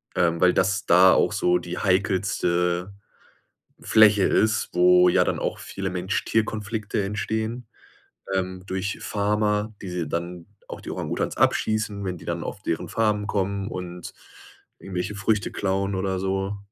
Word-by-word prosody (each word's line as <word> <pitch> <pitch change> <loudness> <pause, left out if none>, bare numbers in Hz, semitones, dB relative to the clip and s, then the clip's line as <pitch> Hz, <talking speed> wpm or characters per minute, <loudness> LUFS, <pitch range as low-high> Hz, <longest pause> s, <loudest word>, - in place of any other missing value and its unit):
ähm, 85 -1 +2
weil 90 -1 +5
das 100 +3 +1
da 90 +1 +6
auch - - +2
so 90 0 +2
die 90 0 -6
heikelste 90 -2 0 0.9
Fläche 105 -3 +5
ist, 110 0 +2
wo 90 0 +6
ja - - +4
dann - - -1
auch - - -3
viele 95 -1 -5
Mensch-Tier-Konflikte 105 +3 -1
entstehen, 110 +4 -3 0.7
ähm, 95 0 -2
durch 95 +2 -3
Farmer, 105 +1 0
die 95 - -6
sie 90 -3 -3
dann 85 +1 -4 0.2
auch - - -7
die - - -7
Orang-Utans - - -3
abschießen, 105 -2 0
wenn 90 -2 -3
die - - -14
dann 85 -1 -3
auf 100 - -7
deren 80 - -3
Farmen 105 -2 0
kommen 100 -1 -1
und 90 -3 -7 0.7
irgendwelche 95 +2 -4
Früchte 100 0 0
klauen 95 0 -1
oder 95 0 -1
so. 95 +1 -2
95 Hz, 145 wpm, -24 LUFS, 90-105 Hz, 0.9 s, da